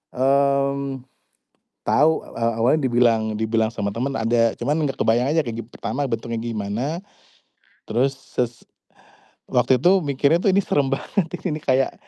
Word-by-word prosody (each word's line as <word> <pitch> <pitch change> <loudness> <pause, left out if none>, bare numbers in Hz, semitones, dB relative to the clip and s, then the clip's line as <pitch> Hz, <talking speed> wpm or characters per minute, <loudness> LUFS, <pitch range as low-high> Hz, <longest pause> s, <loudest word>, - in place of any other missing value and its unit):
Mmm, 140 0 +1 0.8
tau. 150 +3 +4 0.2
E - - -8
awalnya 115 +5 +2
dibilang 120 -2 +3
dibilang 110 0 +1
sama 100 -3 -3
temen 130 +5 -2
ada, 115 0 +2
cuman 145 +6 0
gak 135 - -4
kebayang 120 +3 +2
aja 160 - +3
kayak 115 -3 -5
gim 115 - -10
pertama 135 +4 -3
bentuknya 115 0 -3
gimana, 115 - -3 0.9
terus 130 +5 +1
ses 125 -2 -4 0.9
waktu 125 +1 +3
itu 180 +6 +4
mikirnya 140 +4 +2
tuh 200 - +4
ini 195 - +3
serem 140 -2 +1
banget, 185 +8 -1
ti 180 - -4
ini 155 -2 -3
kayak 130 0 +2
130 Hz, 150 wpm, -22 LUFS, 115-140 Hz, 0.9 s, tau